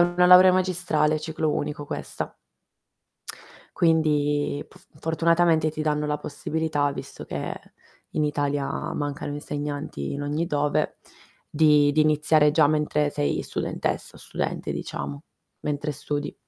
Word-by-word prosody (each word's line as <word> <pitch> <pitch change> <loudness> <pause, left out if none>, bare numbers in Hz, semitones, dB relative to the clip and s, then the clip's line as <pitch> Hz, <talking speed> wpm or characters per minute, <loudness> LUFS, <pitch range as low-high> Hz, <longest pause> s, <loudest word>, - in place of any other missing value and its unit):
una 175 +1 +3
laurea 180 +1 +9
magistrale, 175 -4 +1
ciclo 155 0 -1
unico 145 0 -3
questa. - - -5 1.4
Quindi, 150 -3 +2
pf - - -19
fortunatamente, 165 -1 +2
ti 155 0 -4
danno 150 -1 0
la 150 0 -1
possibilità, 150 -1 -1
visto 135 0 -8
che - - -4 0.6
in 155 - +1
Italia 145 -1 0 0.3
mancano 145 0 -3
insegnanti 145 - -4
in 140 - -4
ogni 150 +4 -1
dove, 145 -2 0 0.5
di 150 -1 +4
di 155 - +2
iniziare 155 0 +4
già 155 0 +5
mentre 150 0 +1
sei 145 0 -1
studentessa - - -3
o - - -14
studente, - - -3
diciamo, 70 0 -5 0.4
mentre 150 0 -2
studi. 145 +1 -4
150 Hz, 125 wpm, -25 LUFS, 145-160 Hz, 1.4 s, laurea